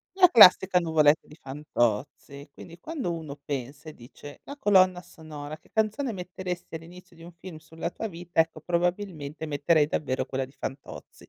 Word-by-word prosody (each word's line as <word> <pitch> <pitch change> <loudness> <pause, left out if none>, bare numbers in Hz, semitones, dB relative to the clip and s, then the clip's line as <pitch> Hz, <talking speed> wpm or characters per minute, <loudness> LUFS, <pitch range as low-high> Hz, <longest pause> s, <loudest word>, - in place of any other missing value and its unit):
La 365 -2 +7
classica 190 - +7
nuvole 155 -3 +4
di 150 - -17
Fantozzi, 140 0 -3
quindi 170 0 -13
quando 280 - -4
uno 155 -3 -7
pensa 140 +2 -6
e - - -14
dice, 145 +4 -13
la 285 - -9
colonna 185 -6 +4
sonora: 155 -2 -10
"Che - - -27
canzone 220 +4 0
metteresti 180 -2 -6
all'inizio 175 +2 -14
di 165 - -16
un 175 - -12
film 170 -1 -11
sulla 160 +2 -6
tua 225 - -5
vita?" 175 -2 -2
Ecco 160 -1 -1
probabilmente 170 -3 -2
metterei 150 +1 +2
davvero 135 -3 -2
quella 135 0 -3
di 135 - -20
Fantozzi, 135 +1 -9
165 Hz, 165 wpm, -26 LUFS, 145-180 Hz, -, La